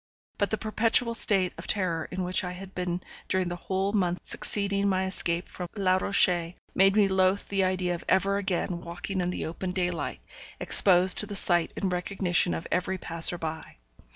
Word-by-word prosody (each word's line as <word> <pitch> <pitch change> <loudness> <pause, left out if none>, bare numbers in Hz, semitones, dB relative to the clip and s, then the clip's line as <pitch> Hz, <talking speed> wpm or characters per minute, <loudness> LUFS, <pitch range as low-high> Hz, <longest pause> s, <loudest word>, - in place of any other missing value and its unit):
But 200 - 0
the 220 - -1
perpetual 230 +2 +1
state 195 -5 +3
of 165 - -8
terror 180 -5 -1
in 185 0 -4
which 180 +1 +1
I 180 0 -5
had 190 +1 -11
been 180 -1 -4 0.3
during 185 -1 -1
the 175 - -4
whole 190 +3 -3
months 180 -4 -2
succeeding 200 -1 0
my 190 0 0
escape 175 -2 -2
from 180 -2 -8
Les 185 -2 +1
Rochers 175 -3 +1 0.2
made 195 +1 +3
me 210 -2 +4
loathe 190 +1 +1
the 195 -1 0
idea 185 -1 -1
of 170 - -7
ever 195 +1 +2
again 180 -2 -3
walking 175 +3 -5
in 175 - -2
the 180 - -4
open 175 +3 -5
daylight, 175 - -3 0.4
exposed 185 -1 +6
to 210 - +2
the 205 - -6
sight 175 -3 +2
and 190 -2 -2
recognition 180 -1 0
of 165 - -6
every 185 +2 -1
passer 170 0 +3
by. 160 -1 -7
185 Hz, 185 wpm, -26 LUFS, 175-195 Hz, 0.4 s, exposed